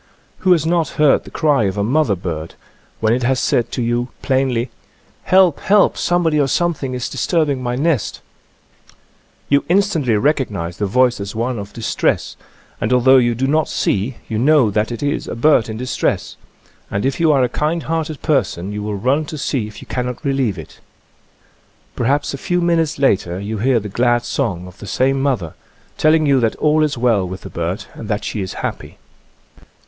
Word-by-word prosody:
Who 185 - +2
has 160 -3 +1
not 170 -1 +1
heard 150 -2 +4
the - - -10
cry 145 -8 +2
of 95 +1 -2
a 100 - +1
mother 130 -1 +2
bird 85 -3 -5 0.2
— - - -35
when 110 +1 +3
it 125 - 0
has 130 +1 +1
said 120 - 0
to 125 - -1
you 120 +1 0 0.2
plainly, 130 -3 0 0.5
"Help! 185 -4 +4
help! 205 0 +3
Somebody 170 -3 +1
or 140 - +3
something 145 -5 -1
is 125 - -3
disturbing 145 0 0
my 120 -1 -2
nest 145 -3 0 0.7
1 - - -24
" - - -37
You 140 0 +3
instantly 175 - +2
recognize 105 - -1
the 105 - -1
voice 125 +3 +2
as 100 +2 -6
one 120 +1 -2
of 100 0 -7
distress, 115 - -1 0.5
and 110 +4 -1
although 130 +1 +5
you 120 -2 +2
do 130 +3 -1
not 155 +2 +2
6ee 105 +6 -1
you 110 - -2
know 135 -4 +4
that 105 +3 0
it 120 - -5
is 145 +1 -1
a - - -4
bird 120 -2 +3
in 110 - -5
distress, 125 +2 -2 0.5
and 100 +4 -2
if 135 +6 -1
you 165 -2 +4
are 135 -3 +3
a - - +3
kind 155 +6 -1
hearted 160 -2 -3
person 100 - 0
you 105 0 -4
will 105 0 -3
run 130 +9 +1
to 155 - -7
see 135 -5 -2
if 105 - -11
you - - -16
cannot 125 +4 -4
relieve 135 -8 0
it. 80 - -11 1.2
Perhaps 140 +5 0
a 140 - -5
few 180 +5 0
minutes 165 -3 +1
later 95 -10 +1
you 105 +2 -4
hear 125 +2 +2
the 105 - -6
glad 120 +3 +1
song 100 -12 -2
of 90 -1 -13
the 100 - -9
same 135 +4 +1
mother, 125 - -1 0.5
telling 155 0 +4
you 140 -2 +4
that 115 -2 +1
all 155 0 +2
is 150 -3 -1
well 115 -5 +2
with 95 +1 -7
the - - -10
bird 85 +3 -3
and 110 - -9
that 105 -1 -1
she 105 - -3
is 95 - -4
happy. - - -6
125 Hz, 200 wpm, -18 LUFS, 110-150 Hz, 1.2 s, although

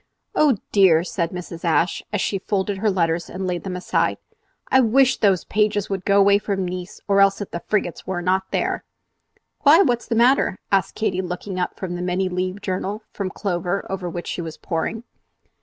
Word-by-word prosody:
"Oh 290 -7 +3
dear!" 180 -5 +5
said 170 -2 -2
Mrs. 175 -2 -8
Ashe, 170 +1 +1
as 210 - -1
she 195 - -1
folded 195 0 -2
her 215 +1 +2
letters 170 -3 0
and 190 +1 -5
laid 180 -1 -2
them 190 -2 -4
aside, 180 - 0 0.5
"I 260 - +6
wish 260 +3 +4
those 195 -5 +3
Pages 210 -1 0
would 190 -2 -3
go 200 0 +4
away 200 0 +5
from 195 -2 -2
Nice, 180 +2 -6
or 200 -1 +4
else 195 0 +4
that 205 - -6
the 170 - -4
frigates 200 -5 -1
were 185 -1 -2
not 190 +1 +1
there." - - -1 0.8
"Why! 315 +6 +6
what's 240 -6 0
the 230 - -1
matter?" 240 -4 +3
asked 195 -2 +1
Katy, 190 -4 0
looking 185 +1 -5
up 180 - -2
from 185 -2 -4
the 175 - -4
many 180 +1 0
leaved 185 +2 -3
journal 195 +3 -3
from 195 -2 -3
Clover 185 -1 -2
over 185 -2 -3
which 175 +1 -6
she - - -4
was 160 -2 -7
poring. 210 +8 -3
190 Hz, 195 wpm, -22 LUFS, 180-205 Hz, 0.8 s, I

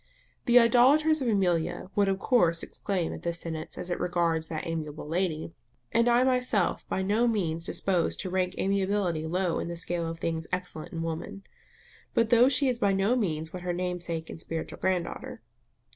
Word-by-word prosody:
The 240 0 +6
idolaters 275 +7 +5
of 255 - -1
Amelia 175 -3 0
would 205 -1 +3
of 195 -1 +1
course 175 -7 +2
exclaim 185 -5 -3
at - - -8
this 170 -1 -2
sentence 160 -1 -6
as 180 - -5
it - - -1
regards 170 -2 0
that 155 -1 -4
amiable 155 -3 -5
lady; 165 -1 -2 0.4
and 235 +1 +3
I 240 +1 +4
am - - +3
myself 250 -7 +1
by 190 - -1
no 215 +5 +2
means 170 -7 -1
disposed 185 -3 0
to 185 - -4
rank 185 0 0
amiability 195 -4 0
low 180 +1 0
in - - -3
the 170 - -4
scale 170 0 -1
of 165 0 -5
things 165 -1 -3
excellent 180 -3 -4
in 165 -3 -4
woman. 165 +4 -5 0.7
But 230 -1 +2
though 240 +2 +6
she 275 +1 +2
is 245 -2 0
by 200 -4 +2
no 195 +5 +2
means 160 -7 -2
what 180 - -6
her 175 0 -2
namesake 175 -2 -3
and 160 - -7
spiritual 165 -1 -5
grand 185 -2 +1
daughter. - - -8
180 Hz, 190 wpm, -28 LUFS, 165-210 Hz, 0.7 s, The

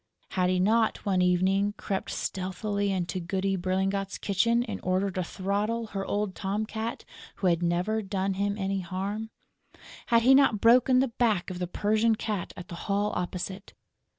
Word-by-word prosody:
Had 180 -1 +1
he 185 0 +1
not, 220 +4 +2
one 190 -3 +2
evening, 190 +3 +2
crept 195 -1 -3
stealthily 200 +2 -2
into 180 -2 -2
Goody 190 +2 -1
Berlingot's 190 +2 -1
kitchen 230 +5 +2
in 215 -5 -5
order 185 +2 0
to 185 0 -2
throttle 205 +6 -2
her 195 -1 -2
old 205 -1 -1
tom 205 +3 -2
cat, 220 +2 -5 0.3
who 195 - -4
had 170 -2 +3
never 180 +6 0
done 195 -1 -1
him 200 +1 -1
any 195 -1 -1
harm? 195 +5 -4 0.8
Had 230 -1 +4
he 260 +3 +7
not 265 -6 +5
broken 250 +3 +5
the 265 - +1
back 220 -7 0
of 180 - -6
the 180 - -2
Persian 215 +4 +2
cat 210 -4 -3
at 180 - -8
the - - -9 0.2
Hall 205 +1 +1
opposite? 185 +2 -4
195 Hz, 170 wpm, -28 LUFS, 185-215 Hz, 0.8 s, he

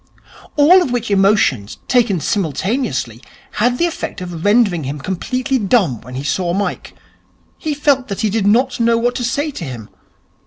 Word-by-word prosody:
All 330 +6 +6
of 345 - -1
which 240 -3 -2
emotions, 195 - +2
taken 230 -8 +2
simultaneously, 160 - -2 0.4
had 245 +2 +2
the 340 - +2
effect 340 - -4
of 175 -3 -7
rendering 205 -6 +3
him 140 +3 -4
completely 255 - -2
dumb 195 - +1
when 125 +2 -10
he 135 - -4
saw 170 +6 -1
Mike. 200 0 -3 0.6
He 305 -2 -2
felt 280 -3 +1
that 200 - -4
he 215 - 0
did 205 -1 0
not 245 +4 +2
know 230 0 +3
what 240 +1 +1
to 245 - -4
say 285 +6 -1
to 220 - -7
him. 120 -7 -8
210 Hz, 170 wpm, -17 LUFS, 165-250 Hz, 0.6 s, All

